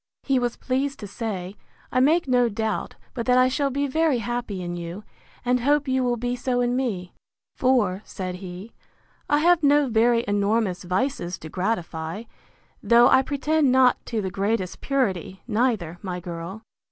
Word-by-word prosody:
He 270 -2 +2
was 240 -1 -2
pleased 270 +2 -2
to 205 - -6
say, 200 -3 -5 0.3
I 255 - +2
make 310 +5 +3
no 245 -2 +3
doubt 220 0 -3 0.2
but 235 0 -4
that 250 0 +5
I 255 0 +6
shall 280 +2 0
be 280 +2 -1
very 310 0 +2
happy 235 -4 -3
in 175 0 -4
you; 175 +4 -6 0.4
and 250 +1 +2
hope 290 +3 +2
you 260 0 +1
will 245 -1 +1
be 245 +1 -2
so 250 0 -1
in 245 0 +1
me: 205 -9 -2 0.4
For, 220 -8 +2
said 185 -3 -5
he, 185 +3 -9 0.6
I 295 - +4
have 345 +1 +4
no 290 0 +4
very 235 +1 +3
enormous 205 -1 +1
vices 185 0 -1
to 155 - -10
gratify; 180 -1 -3 0.6
though 235 +1 +6
I 260 - +6
pretend 290 +1 +1
not 255 -1 +4
to 225 -3 -2
the 190 - -3
greatest 195 -1 -2
purity, 195 - -1
neither, 210 -8 0
my 180 -3 -4
girl. 175 +4 -7
235 Hz, 170 wpm, -24 LUFS, 190-260 Hz, 0.6 s, I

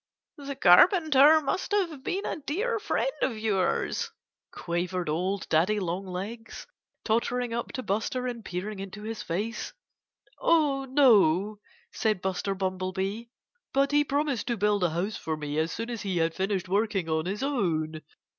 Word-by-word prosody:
"The 280 -1 -6
Carpenter 310 - +6
must 370 +7 -2
have 335 -9 0
been 390 +8 -2
a - - -2
dear 405 - -2
friend - - 0
of 240 -4 0
yours," 215 - 0 0.4
quavered 175 0 -3
old 185 +5 -1
Daddy 185 +7 +2
Longlegs, 190 +5 -5 0.4
tottering 240 +1 0
up 235 0 -3
to 255 - -4
Buster 225 +5 -1
and 240 -2 -4
peering 195 +3 -5
into 195 +2 -7
his 225 0 -5
face. 210 +7 -3 0.7
"Oh, 290 -5 +2
no!" 215 - +4 0.3
said 215 -3 0
Buster 190 +1 -2
Bumblebee. 190 +3 -2 0.5
"But 275 +1 +2
he 295 0 +4
promised 285 -5 -1
to 235 - -1
build 205 -1 +1
a 175 - +3
house 180 +7 -2
for 160 -1 -3
me 150 0 -3
as 160 +1 0
soon 230 +1 -4
as 230 - -4
he 190 -3 -2
had 165 0 +1
finished 190 0 -2
working 200 -2 0
on 160 +1 -1
his 200 +6 -3
own. 160 - -1
210 Hz, 155 wpm, -27 LUFS, 185-265 Hz, 0.7 s, Carpenter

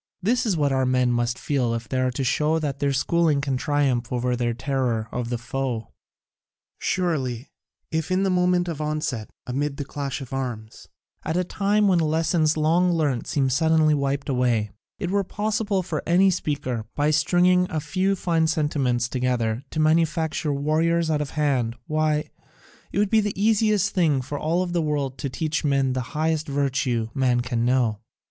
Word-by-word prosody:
This 230 +6 +1
is 190 -6 +1
what 145 -2 +1
our 130 -1 +1
men 125 -1 +2
must 120 0 0
feel 125 -5 0
if 115 -1 -5
they 130 - -1
are 130 0 +2
to 125 +2 -3
show 150 +5 +1
that 145 -4 -3
their 140 -1 +1
schooling 155 +3 +2
can 140 -1 -1
triumph 135 -3 0
over 125 0 0
their 120 -1 -1
terror 125 -4 -1
of 120 -1 -3
the 120 - -1
foe. 120 -1 -3 0.9
Surely, 135 -9 -1 0.4
if 160 -1 -1
in 185 +1 +1
the 195 - +1
moment 180 0 +2
of 160 -3 -4
onset, 150 -7 -2 0.2
amid 140 +3 -2
the 145 - -4
clash 140 -1 -4
of 135 -2 -9
arms, 120 -5 -5 0.4
at 160 - -1
a 180 - +2
time 205 +3 +1
when 185 -3 +4
lessons 160 0 +1
long 170 +4 +3
learnt 145 -8 0
seem 140 -2 +1
suddenly 155 +3 +3
wiped 140 -1 -1
away, 120 -6 +1 0.3
it 185 -3 -3
were 200 0 +2
possible 205 0 -1
for 160 -4 -3
any 185 +3 +5
speaker, 135 -9 -2
by 150 +1 +2
stringing 180 +3 +3
a 155 - -1
few 190 +5 0
fine 165 -3 +1
sentiments 145 -7 0
together, 125 -3 -1
to 155 - -4
manufacture 160 -1 +1
warriors 160 +3 +1
out 150 -1 +1
of 145 - -3
hand, 130 -6 +1
why, 155 0 0 0.6
it - - -4
would 205 -1 +2
be 220 -1 +5
the 205 -2 -3
easiest 210 -1 +2
thing 165 -6 +3 0.2
in 145 - -1
all 170 +5 0
the 175 -1 -1
world 145 -4 -2
to 140 - -2
teach 155 +5 -2
men 135 -3 +1
the 130 - -1 0.2
highest 160 0 0
virtue 135 -5 0
man 125 -2 +2
can 120 -2 -1
know. 120 -4 +1
150 Hz, 180 wpm, -24 LUFS, 130-170 Hz, 0.9 s, any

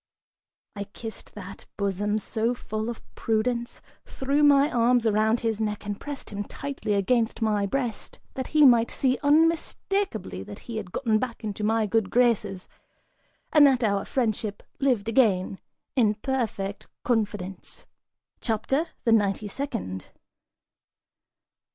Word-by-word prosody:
I 200 0 -4
kissed 220 +2 -9
that, 195 -1 -9
bosom, 205 +1 0
so 225 +3 -1
full 215 -1 -4
of 235 - -7
prudence, 235 +2 -1 0.2
threw 275 +2 -1
my 285 0 +5
arms 240 0 +3
around 220 +1 +2
his 225 -2 -1
neck 210 -1 -2
and 205 0 -4
pressed 290 -5 -7
him 205 0 -3
tightly 265 -2 -3
against 225 +3 +1
my 210 -3 +1
breast, 240 0 -3
that 260 - -4
he 305 -1 +5
might 235 -3 +6
see 260 -1 +1
unmistakably 320 - +1
that 105 +2 -9
he 230 -2 -5
had 195 -5 -5
gotten 220 -2 +1
back 240 -1 -4
into 210 -1 -4
my 220 +1 +2
good 210 -1 +1
graces, 215 -6 +1 0.9
and 295 -2 +8
that 260 -3 +2
our 200 -2 +1
friendship 220 -4 -2 0.2
lived 250 -7 +1
again 205 -6 +2 0.4
in 215 -5 +3
perfect 220 -6 -3 0.2
confidence. 210 -5 -2 0.5
CHAPTER 265 +8 0 0.2
THE 230 - +2
NINETY 205 -1 +2
SECOND. 220 - -4
225 Hz, 130 wpm, -26 LUFS, 205-255 Hz, 0.9 s, and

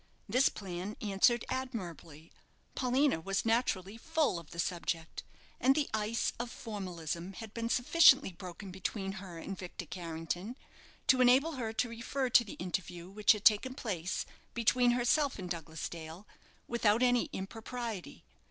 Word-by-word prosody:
This 250 +6 +4
plan 190 +1 -6
answered 215 +3 +3
admirably; 175 - -5 0.4
Paulina 260 - +2
was 195 +5 -1
naturally 225 -3 0
full 315 - +1
of 170 - -14
the 170 - -11
subject, 170 -2 -2 0.4
and 265 +2 +4
the 295 -2 +1
ice 220 +1 0
of 240 0 -3
formalism 180 -6 -5
had 220 +1 -9
been 230 0 -2
sufficiently 270 - +6
broken 185 +2 -9
between 195 +1 -3
her 180 -4 -9
and 195 +4 -5
Victor 180 -1 -7
Carrington, 175 - -5 0.5
to 260 -1 +5
enable 260 +6 +5
her 245 -7 -3
to 245 - +1
refer 240 +3 -3
to 240 - +7
the 215 - -8
interview 180 -1 -4
which 210 +1 +5
had 210 -1 -7
taken 240 +5 +5
place 185 -8 -2 0.3
between 240 +1 +4
herself 250 +4 +2
and 180 -3 -6
Douglas 160 -2 -4
Dale 165 +3 -9 0.4
without 230 0 +3
any 245 -1 +3
impropriety. 225 +1 -6
210 Hz, 145 wpm, -32 LUFS, 180-245 Hz, 0.5 s, to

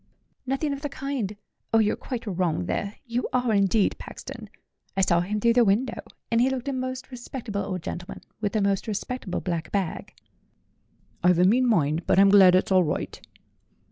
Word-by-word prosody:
"Nothing 275 +3 0
of 280 - -6
the 290 - -3
kind! 270 -7 -3 0.4
Oh, 225 - +4
you're 215 -1 +3
quite 245 -3 -6
wrong 175 - -1
there 200 - -3
you 240 +1 -2
are, 250 -3 +1
indeed, 200 +1 +2
Paxton! - - -9 0.5
I - - +3
saw 170 -2 +3
him 200 +5 -1
through 235 +2 +3
the 245 0 +5
window, 225 +4 +1 0.3
and 230 0 +3
he 255 - +4
looked 265 0 -4
a 275 - -1
most 255 0 -4
respectable 240 -4 -5
old 185 -3 -4
gentleman, 180 +1 -6 0.2
with 210 0 -2
a 215 - +2
most 200 +1 0
respectable 215 -2 -3
black 170 -3 -3
bag." 195 -5 -2 1.1
"I've 180 -1 +5
a 180 - +4
mean 250 +6 +4
mind; 165 -6 +1
but - - +3
I'm 195 +1 +7
glad 190 -2 +7
it's 185 - +1
all 185 -1 +5
right." 150 - -3
210 Hz, 185 wpm, -25 LUFS, 185-250 Hz, 1.1 s, I'm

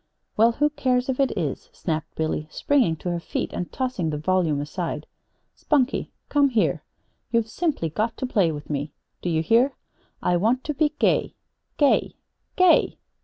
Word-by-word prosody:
"Well, 230 +2 +5
who 295 +4 +1
cares 255 -3 0
if 260 - -1
it 275 - +3
is," 155 -7 -3
snapped 160 -3 -4
Billy, 155 -1 -2
springing 250 - +2
to 175 +3 -4
her 170 - -1
feet 170 - -4
and 180 - -4
tossing 250 -11 -2
the 150 - -2
volume 160 -2 +1
aside. 150 +1 -4 0.5
"Spunkie, 280 -3 +1 0.2
come 285 -1 +3
here! 230 -4 +1 0.5
You've 230 -2 +2
simply 300 - -1
got 220 +8 -2
to - - -2
play 200 -9 +2
with 150 -1 -7
me. 145 0 -3 0.3
Do 180 - -2
you 160 -1 +1
hear? 240 - +4 0.5
I 175 - +1
want 230 +8 +1
to 300 - -2
be 300 +1 +1
gay - - +1 0.4
gay 290 -2 +3 0.4
GAY! 365 -2 +4
215 Hz, 170 wpm, -24 LUFS, 160-260 Hz, 0.5 s, Well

